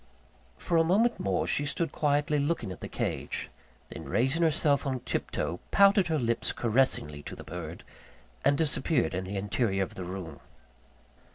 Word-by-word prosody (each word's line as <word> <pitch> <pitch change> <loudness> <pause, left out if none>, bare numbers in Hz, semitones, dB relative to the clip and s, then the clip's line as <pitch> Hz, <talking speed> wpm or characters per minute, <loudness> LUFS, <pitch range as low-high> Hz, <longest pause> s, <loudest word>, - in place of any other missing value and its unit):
For 170 - 0
a 165 - +5
moment 215 +8 +2
more, 95 -3 0
she 145 - +1
stood 145 +4 0
quietly 145 0 +1
looking 140 - -1
at 90 - -9
the - - -5
cage; - - -3 0.4
then - - -8
raising 130 - +1
herself 150 -4 +2
on 130 -2 -2
tip - - -3
toe, 85 - -3
pouted 200 -2 +5
her 160 -2 +1
lips 115 -4 0
caressingly 110 - +1
to - - -8
the - - -10
bird, 85 -1 -7 0.6
and 140 - +3
disappeared 150 - +2
in 95 +1 -2
the 100 +2 -4
interior 95 0 0
of 95 - -7
the 95 - -6
room. 90 -5 -7
130 Hz, 170 wpm, -29 LUFS, 95-160 Hz, 0.6 s, a